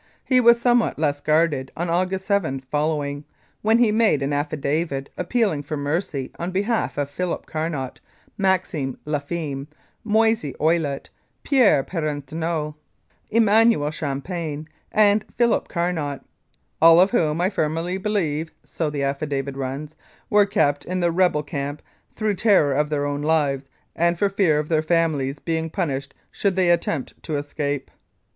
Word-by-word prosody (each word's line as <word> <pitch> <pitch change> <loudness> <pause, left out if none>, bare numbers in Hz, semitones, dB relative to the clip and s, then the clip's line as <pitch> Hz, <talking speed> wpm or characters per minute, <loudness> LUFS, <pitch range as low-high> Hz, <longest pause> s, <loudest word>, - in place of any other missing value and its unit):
He 255 -1 +4
was 235 0 +6
somewhat 240 -1 +2
less 145 -2 0
guarded 155 -4 +1
on 175 +2 -1
August 185 +3 0
7 170 -10 0
following, 145 -1 -1 0.4
when 220 +2 +4
he 235 -3 +4
made 215 -10 +3
an 140 +1 -1
affidavit 145 0 -2
appealing 195 -5 0
for 150 +1 -5
mercy 145 -2 -2
on 170 +1 -2
behalf 205 +2 -1
of 145 -1 0
Philip 180 +3 -3
Carnot, 155 -5 -4 0.4
Maxime 185 -9 0
Lafime, 145 -1 -3 0.4
Moise 220 -8 +1
Ouilette, 155 -3 0 0.3
Pierre 245 - +4
Parenteau, 155 0 -3 0.6
Emmanuel 220 -8 +4
Champagne, 155 +1 -4 0.2
and 210 0 +4
Philip 240 -1 +2
Carnot, 170 -6 -2 0.6
"All 165 +1 +8
of 190 +2 +5
whom 160 -9 +1
I 185 +3 +1
firmly 165 +2 -1
believe 165 -7 -1
(so 160 -3 -3
the 145 -1 -3
affidavit 140 0 -2
runs) 135 +3 -5 0.4
were 205 -1 +5
kept 145 -7 +1
in 185 +1 -3
the 175 -1 +2
rebel 175 -4 +2
camp 145 -1 -5 0.3
through 215 -1 0
terror 190 -11 +4
of 150 +2 +1
their 145 -2 -1
own 145 0 -2
lives 145 -3 0 0.3
and 170 +1 +2
for 200 +3 +2
fear 195 -6 +2
of 150 0 -1
their 155 -1 +2
families 155 -4 +1
being 160 +2 -2
punished 140 -4 -3 0.2
should 200 -2 0
they 185 -2 +3
attempt 165 -5 -1
to 155 - -3
escape." 145 -1 -3
160 Hz, 145 wpm, -23 LUFS, 145-185 Hz, 0.6 s, All